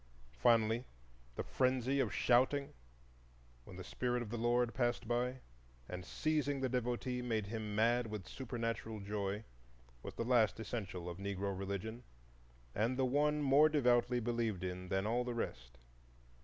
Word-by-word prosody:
Finally 115 - +4 0.5
the - - -2
Frenzy 130 +1 +1
of 125 -6 +1
"Shouting," 130 +3 +3 0.9
when 90 - -10
the 95 - -6
Spirit 125 +5 -1
of 110 - -8
the 120 - -2
Lord 120 0 +2
passed 120 -2 0
by, 125 +2 0 0.5
and, 90 0 -5
seizing 145 +3 0
the 130 -1 0
devotee, 125 0 -1
made 115 -4 -1
him 105 0 -4
mad 120 +2 +3
with 105 -3 -6
supernatural 115 -3 -4
joy, 100 +1 -3 0.6
was - - -8
the 115 - -2
last 115 -4 +3
essential 100 -6 -4
of 90 +1 -6
Negro 100 0 -2
religion 100 +4 -4 0.7
and 115 +5 0
the 130 - +3
one 150 +3 +2
more 145 +3 +6
devoutly 125 -4 +3
believed 115 -5 -1
in 90 0 -4
than 95 +2 0
all 120 +3 +1
the 120 -1 -3
rest. 65 - -4
120 Hz, 150 wpm, -36 LUFS, 105-125 Hz, 0.9 s, more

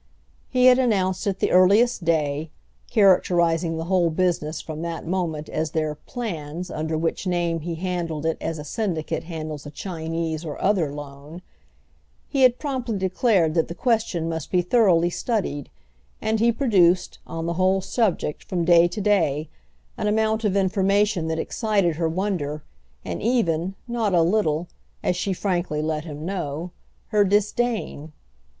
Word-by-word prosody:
He 255 -1 +3
had 255 0 +7
announced 190 -7 +1
at 195 -1 0
the - - 0
earliest 200 +4 +4
day—characterising 165 +2 +1
the 160 - -3
whole 175 -1 +2
business, 160 -2 0
from 155 -1 -6
that 170 -1 -4
moment, 165 -4 -2
as 155 0 -2
their 155 0 -1
"plans," 170 - -6
under 160 +1 -2
which 165 +4 -2
name 170 -2 0
he 165 +2 -4
handled 170 -3 -3
it 165 - 0
as 165 - -3
a 150 - -6
Syndicate 165 -1 -3
handles 155 -3 -6
a - - -6
Chinese 165 -1 -4
or 155 -3 -6
other 185 -7 +1
Loan—he 145 - -9
had 250 -1 +6
promptly 255 -7 -3
declared 185 -3 +2
that 165 -1 +1
the 170 - -7
question 220 -8 0
must 160 -2 -4
be 180 -1 +2
thoroughly 180 -4 +3
studied, 180 - -2 0.5
and 220 0 0
he 235 +2 +4
produced, 185 -8 +2
on 165 0 -4
the 170 - -1
whole 185 +2 +2
subject, 190 -6 -1
from 175 -2 -2
day 170 0 +6
to 205 +4 -5
day, 160 -8 +1 0.5
an - - 0
amount 220 +1 +1
of 200 -2 +1
information 195 -1 +2
that 160 0 -1
excited 195 -3 0
her 165 -1 0
wonder 160 -5 -2 0.4
and - - -4
even, 190 -6 +1
not 225 -5 0
a 170 - +5
little, 170 -3 +1 0.4
as 180 - +1
she 185 +2 -1
frankly 180 -5 -1
let 155 0 -2
him 150 -1 -7
know, 175 -2 -4 0.4
her 210 -2 +4
disdain. 205 -5 0
175 Hz, 155 wpm, -24 LUFS, 160-205 Hz, 0.5 s, had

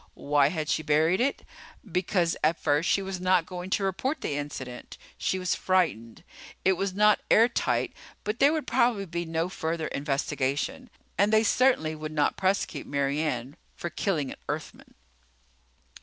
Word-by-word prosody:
Why 145 -1 +3
had 155 0 -3
she 155 - +1
buried 155 +4 +2
it? 275 +3 0 0.4
Because 180 -2 0
at 160 +2 +2
first 150 +2 +1
she 195 - +2
was 190 -1 -5
not 185 -2 +3
going 180 +1 -7
to 195 - 0
report 255 - -1
the - - -2
incident. 135 -4 -6 0.2
She 190 - -1
was 180 -2 0
frightened. 155 -12 0 0.4
It 190 - +5
was 190 0 -2
not 210 +1 +5
airtight, 235 +2 +3 0.3
but 210 +3 -3
there 280 +2 +6
would 315 -1 -1
probably 235 -4 +2
be 170 -1 -4
no 165 +1 -1
further 165 -3 -3
investigation. 140 - -2 0.3
And 205 +2 +4
they 220 0 +5
certainly 225 -9 +3
would 155 0 -6
not 150 -1 +1
prosecute 190 +1 -1
Mary 140 +1 0
Ann 135 -3 -3 0.2
for 175 - -5
killing 155 -5 -1
an - - -9
Earthman. - - -6
175 Hz, 160 wpm, -27 LUFS, 150-195 Hz, 0.4 s, there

